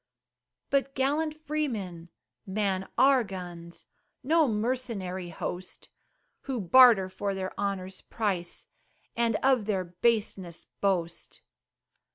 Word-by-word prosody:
But 275 Hz, -1 st, +1 dB
gallant 305 Hz, +3 st, 0 dB
freemen 210 Hz, -, -3 dB, 0.4 s
man 190 Hz, -1 st, -1 dB
our 265 Hz, -2 st, +5 dB
guns 175 Hz, -4 st, -8 dB, 0.4 s
No 315 Hz, +3 st, +4 dB
mercenary 210 Hz, -6 st, -2 dB
host, 180 Hz, +2 st, -6 dB, 0.6 s
Who 265 Hz, -3 st, -2 dB
barter 220 Hz, 0 st, +7 dB
for 195 Hz, +1 st, -3 dB
their 190 Hz, -1 st, -4 dB
honor's 195 Hz, -2 st, -3 dB
price, 190 Hz, -6 st, -3 dB, 0.5 s
And 230 Hz, -1 st, +1 dB
of 260 Hz, -5 st, +3 dB
their 195 Hz, -3 st, 0 dB
baseness 185 Hz, -1 st, -1 dB
boast. 175 Hz, -4 st, -3 dB
200 Hz, 100 wpm, -28 LUFS, 185-255 Hz, 0.6 s, barter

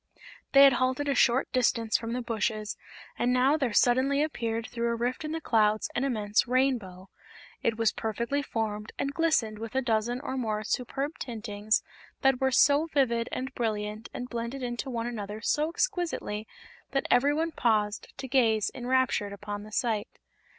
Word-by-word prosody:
They 275 Hz, 0 st, +9 dB
had 275 Hz, -1 st, +8 dB
halted 260 Hz, +3 st, +1 dB
a 280 Hz, -, +2 dB
short 255 Hz, 0 st, +3 dB
distance 230 Hz, -3 st, +1 dB
from 230 Hz, 0 st, 0 dB
the 250 Hz, 0 st, -2 dB
bushes 220 Hz, -1 st, -2 dB, 0.4 s
and 245 Hz, -, +2 dB
now 255 Hz, +3 st, +4 dB
there 270 Hz, -6 st, 0 dB
suddenly 260 Hz, +6 st, +3 dB
appeared 230 Hz, -7 st, -2 dB
through 235 Hz, 0 st, -2 dB
a 235 Hz, -, 0 dB
rift 245 Hz, +5 st, -2 dB
in 305 Hz, -, -4 dB
the 325 Hz, -, -2 dB
clouds 215 Hz, -6 st, +2 dB
an 245 Hz, -, 0 dB
immense 215 Hz, -5 st, +1 dB
Rainbow. 235 Hz, -8 st, 0 dB, 0.5 s
It 225 Hz, -1 st, 0 dB
was 225 Hz, -1 st, +2 dB
perfectly 235 Hz, +6 st, -2 dB
formed 215 Hz, -5 st, -3 dB
and 275 Hz, 0 st, -2 dB
glistened 270 Hz, -11 st, +1 dB
with 225 Hz, +2 st, -7 dB
a 265 Hz, -, +3 dB
dozen 235 Hz, +1 st, 0 dB
or 265 Hz, -2 st, -4 dB
more 215 Hz, -4 st, -1 dB
superb 270 Hz, +7 st, -3 dB
tintings 215 Hz, -3 st, -1 dB, 0.4 s
that 270 Hz, -1 st, +3 dB
were 265 Hz, -, +3 dB
so 285 Hz, +4 st, +4 dB
vivid 240 Hz, -6 st, +1 dB
and 260 Hz, +1 st, -4 dB
brilliant 215 Hz, -1 st, -3 dB
and 250 Hz, -, -5 dB
blended 235 Hz, +2 st, -4 dB
into 240 Hz, +2 st, -3 dB
one 235 Hz, -2 st, -2 dB
another 215 Hz, -3 st, -5 dB
so 300 Hz, +7 st, +1 dB
exquisitely 340 Hz, -, -2 dB, 0.5 s
that 275 Hz, -1 st, 0 dB
every 285 Hz, +4 st, +4 dB
one 325 Hz, +2 st, 0 dB
paused 215 Hz, -6 st, 0 dB
to 265 Hz, -, -6 dB
gaze 230 Hz, -5 st, +2 dB
enraptured 250 Hz, -5 st, 0 dB
upon 205 Hz, 0 st, -6 dB
the 215 Hz, +1 st, -11 dB
sight. 215 Hz, -2 st, 0 dB
240 Hz, 170 wpm, -28 LUFS, 220-270 Hz, 0.5 s, They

